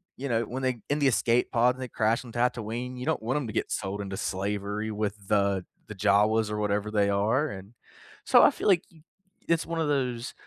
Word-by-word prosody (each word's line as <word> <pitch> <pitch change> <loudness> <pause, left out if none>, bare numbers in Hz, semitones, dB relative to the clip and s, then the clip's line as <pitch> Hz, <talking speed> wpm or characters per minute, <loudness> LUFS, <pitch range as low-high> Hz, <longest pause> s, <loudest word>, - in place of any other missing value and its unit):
you 135 +1 -5
know, 115 0 +1
when 130 +4 -5
they 130 -3 0
in 145 +1 +1
the 140 - +3
escape 120 -1 +2
pod 125 +2 +3
and 130 - -10
they 125 - -5
crash 115 +3 +1
on 120 - -11
Tatooine, 120 +1 -2
you 125 - -5
don't - - 0
want 120 +5 -1
'em 140 - -2
to 110 - -6
get - - -1
sold 100 +1 -3
into 100 -1 -4
slavery 100 +2 -3
with 105 -1 -4
the 100 -3 +1 0.2
the 110 - -8
Jawas 105 +2 +3
or 105 - -3
whatever 105 0 -1
they 105 -2 +2
are, 110 +9 +1
and 100 +2 -9 0.5
so - - +6
I - - +8
feel - - -4
like, 180 -3 +4
you 160 -3 -20 0.5
it's 165 -1 +2
one 165 0 -3
of 155 - 0
those, 125 -4 -1
110 Hz, 230 wpm, -27 LUFS, 105-125 Hz, 0.5 s, I